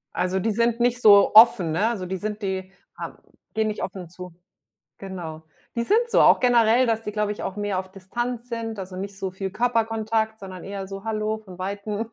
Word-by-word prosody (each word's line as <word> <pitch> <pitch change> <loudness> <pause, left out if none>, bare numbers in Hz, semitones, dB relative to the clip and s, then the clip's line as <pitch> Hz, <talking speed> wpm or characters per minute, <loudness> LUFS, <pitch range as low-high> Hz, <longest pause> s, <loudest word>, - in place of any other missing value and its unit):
Also, 185 +1 0
die 220 +4 0
sind 235 +2 +1
nicht 245 +1 +1
so 200 -3 +7
offen, 215 -7 +7
ne? 190 +8 +1
Also, 220 -6 -2
die 190 +1 -3
sind 210 +2 -5
die 190 -1 -3 0.3
haben - - -7 0.4
gehen 220 -1 +1
nicht 210 - -3
offen 185 -3 -6
zu. 180 0 -10 0.7
Genau. 170 -5 -7 0.3
Die 235 - 0
sind 470 - +2
so, - - +4
auch - - +7
generell, 240 0 +4
dass 225 -1 0
die, 210 - -5
glaube 210 0 0
ich, 210 - -8
auch 195 - -4
mehr 205 -2 -1
auf 185 0 -5
Distanz 240 +6 -5
sind. 225 -2 -4
Also, 185 -1 -7
nicht 195 +1 -6
so 190 -1 -3
viel 190 +1 -5
Körperkontakt, 225 -1 0
sondern 185 -3 -9
eher 195 -1 -5
so: 195 +1 -8
„Hallo“ 215 0 -2
von 190 -4 -13
weitem. 200 +3 -4
210 Hz, 210 wpm, -24 LUFS, 190-225 Hz, 0.7 s, so